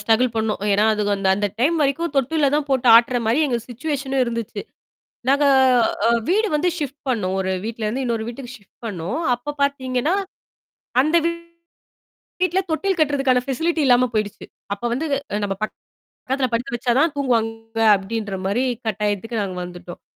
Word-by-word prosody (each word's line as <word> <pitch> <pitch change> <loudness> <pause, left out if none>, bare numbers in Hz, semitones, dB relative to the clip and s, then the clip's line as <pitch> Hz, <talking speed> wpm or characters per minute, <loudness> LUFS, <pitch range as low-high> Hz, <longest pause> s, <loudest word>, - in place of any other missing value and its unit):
Struggle 235 +2 +2
பண்ணோம். 220 -2 -1
ஏன்னா 205 +2 +3
அது 210 - -1
அந்த 195 -1 0
அந்த 205 - 0
டைம் 310 +7 +3
வரைக்கும் 285 +4 0
தொட்டில்ல 280 +2 +2
தான் 295 -1 0
போட்டு 255 -2 +2
ஆட்டுற 240 +1 +4
மாரி 230 +6 +2
எங்க 245 -4 0
சிட்சுவேஷனும் 270 +1 -2
இருந்துச்சு. 230 -2 -4 0.7
நாங்க 285 +1 +3 0.6
அ - - +4 0.2
வீடு 430 +4 +3
வந்து 335 +4 +2
ஷிப்ட் 285 -2 -5
பண்ணோம். 190 -6 0
ஒரு 190 0 -1
வீட்டுலருந்து 230 +3 -3
இன்னொரு 230 -2 -1
வீட்டுக்கு 245 +1 -7
ஷிப்ட் 200 -4 -29
பண்ணோம். 195 - -3 0.2
அப்பப் 285 +4 -7
பாத்தீங்கன்னா, 270 +2 0 0.9
அந்த 310 +5 +1 1.0
வீட்டுல 365 +1 -1
தொட்டில் 380 +4 0
கட்டுறதுக்கான 275 -4 +2
ஃபெசிலிட்டி 325 +5 0
இல்லாம 250 0 +5
போயிடுச்சு. 210 -2 -2 0.3
அப்ப 200 - -10
வந்து, 285 +6 -2 0.4
"நம்ப 195 -1 -1 0.5
பக்கத்துல 265 0 -2
படுக்க 245 +4 -1
வச்சா 240 0 0
தான் 320 0 +3
தூங்குவாங்க." 225 -4 -1 0.2
அப்படீன்ற 205 0 -4
மாரி 220 +7 +1 0.2
கட்டாயத்துக்கு 210 +1 -1
நாங்க 185 -2 -4
வந்துட்டோம். 175 0 -10
245 Hz, 150 wpm, -21 LUFS, 220-280 Hz, 1.0 s, இல்லாம